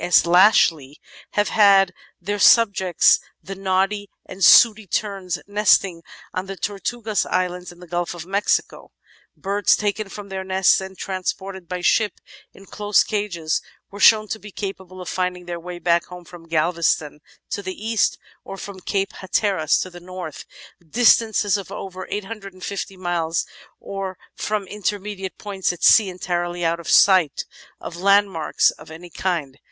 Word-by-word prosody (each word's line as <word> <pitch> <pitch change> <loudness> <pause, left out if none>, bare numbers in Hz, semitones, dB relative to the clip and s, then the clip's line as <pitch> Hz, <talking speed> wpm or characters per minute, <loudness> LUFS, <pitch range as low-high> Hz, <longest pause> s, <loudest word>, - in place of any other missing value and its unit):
S. 175 - +4
Lashley 170 -6 +4 0.3
have 205 0 +1
had 195 -3 +5
as - - -37 0.3
their 205 +4 -3
sub 230 -2 +6
jects 185 -3 +3 0.2
the 195 - -7
Noddy 195 +1 -1 0.2
and 185 +1 -6
Sooty 220 +2 +7
Terns 190 -3 -2
nesting 200 -4 +2 0.3
on 185 +1 -4
the 195 0 -7
Tortugas 210 +2 -2
Islands 180 0 -2
in 175 - -17
the 180 - -12
Gulf 175 0 -3
of 170 -1 -8
Mexico. 200 +3 -1 0.5
Birds 200 +1 +2
taken 210 0 -2
from 200 0 -9
their 190 0 -4
nests 190 0 +3
and 190 0 -9
trans 185 -1 -2
ported 190 -2 -10
by 180 0 -4
ship 210 +4 +2 0.4
in 195 - -16
closed 205 0 +1
cages 180 -7 -2 0.3
were 200 - -10
shown 215 0 +6
to 220 - -4
be 210 - -11
capable 190 -2 -7
of 180 - -9
finding 180 -1 -3
their 175 -1 -5
way 175 +1 -8
back 170 -1 +1 0.2
from 165 +1 -14
Galveston 160 -2 0 0.3
(to - - -2
the 185 -1 -6
east) 225 +1 0 0.3
or 195 - -8
from 195 -1 -8
Cape 195 +1 -2
Hatteras 190 -4 0
(to 185 - -6
the 175 - -11
north), 180 -3 -8 0.4
distances 220 +2 +3
of 195 - -8
over 185 -1 -7
850 195 -2 -6
miles, 170 -2 -1 0.3
or 195 -2 -6 0.2
from 210 -2 -3
in 210 +2 -10
termediate 200 -1 -4
points 195 -3 -2
at 175 - -10
sea 210 -4 +6
entirely 175 -1 -3
out 165 +1 0
of 170 - -8
sight 185 -7 +4 0.3
of - - -8
landmarks 195 -3 +2
of 150 - -15
any 170 +2 -11
kind. 155 -8 -3
190 Hz, 160 wpm, -21 LUFS, 175-205 Hz, 0.5 s, Sooty